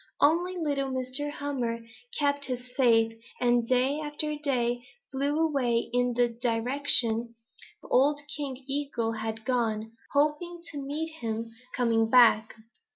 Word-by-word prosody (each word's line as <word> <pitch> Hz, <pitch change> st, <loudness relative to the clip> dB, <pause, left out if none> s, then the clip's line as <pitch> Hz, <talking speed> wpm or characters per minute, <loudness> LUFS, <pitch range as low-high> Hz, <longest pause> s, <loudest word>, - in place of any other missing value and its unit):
Only 350 Hz, +4 st, +3 dB
little 285 Hz, -5 st, -1 dB
Mr. 260 Hz, +3 st, -2 dB
Hummer 250 Hz, -6 st, -3 dB, 0.3 s
kept 285 Hz, -1 st, +1 dB
his 250 Hz, -1 st, -5 dB
faith 225 Hz, -4 st, +3 dB, 0.2 s
and 240 Hz, -1 st, +2 dB
day 260 Hz, +4 st, +2 dB
after 300 Hz, 0 st, -2 dB
day 245 Hz, -5 st, -1 dB, 0.3 s
flew 280 Hz, +2 st, 0 dB
away 260 Hz, -8 st, +1 dB
in 245 Hz, -1 st, +1 dB
the 245 Hz, 0 st, +4 dB
direction 235 Hz, 0 st, +1 dB, 0.5 s
old 290 Hz, +3 st, +3 dB, 0.2 s
King 275 Hz, -3 st, -5 dB
Eagle 275 Hz, -5 st, -1 dB
had 220 Hz, 0 st, -4 dB
gone, 225 Hz, -4 st, 0 dB, 0.2 s
hoping 305 Hz, +4 st, 0 dB
to 290 Hz, -2 st, -5 dB
meet 305 Hz, +4 st, -3 dB
him 230 Hz, 0 st, -3 dB, 0.2 s
coming 225 Hz, -2 st, +2 dB
back. 230 Hz, -3 st, +5 dB
255 Hz, 125 wpm, -28 LUFS, 230-290 Hz, 0.5 s, back